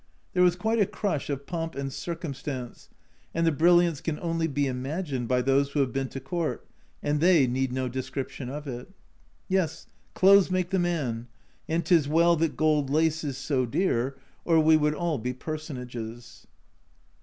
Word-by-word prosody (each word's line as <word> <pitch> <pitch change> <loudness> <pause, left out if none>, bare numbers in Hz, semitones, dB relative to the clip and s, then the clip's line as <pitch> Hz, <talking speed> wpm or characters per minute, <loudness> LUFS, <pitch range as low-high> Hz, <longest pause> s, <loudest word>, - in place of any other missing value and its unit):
There 180 - +2
was 180 -1 +5
quite 220 +5 0
a 200 - +4
crush 155 -10 -2
of 140 -1 -3
Pomp 165 -2 -4
and 135 -1 -4
Circumstance, 140 -7 -6 0.5
and 165 0 +2
the 165 - +4
brilliance 170 0 +4
can 160 -2 -3
only 165 -1 -1
be 145 -1 0
imagined 135 0 -3
by 125 0 +2
those 135 +2 +2
who 150 - 0
have 130 -2 -1
been 135 -1 -1
to 135 - -6
Court, 160 +5 -3 0.4
and 145 0 +1
they 170 -4 +5
need 130 +1 -1
no 130 0 -1
description 130 0 -5
of 145 +2 -6
it. 125 +2 -6 0.6
Yes, 170 -4 0 0.3
clothes 195 0 +6
make 185 0 -1
the 190 - +2
man, 140 -10 -1 0.4
and 165 +2 0
'tis 165 -6 +4
well 170 +3 +4
that 160 -1 0
gold 150 -3 +2
lace 160 +2 +1
is 140 -3 -3
so 135 -3 0
dear, 135 -2 0 0.3
or 165 -2 +4
we 160 0 +6
would 150 -1 +2
all 170 -3 -1
be 125 +3 -3
Personages. 125 -6 -7
150 Hz, 175 wpm, -27 LUFS, 130-170 Hz, 0.6 s, clothes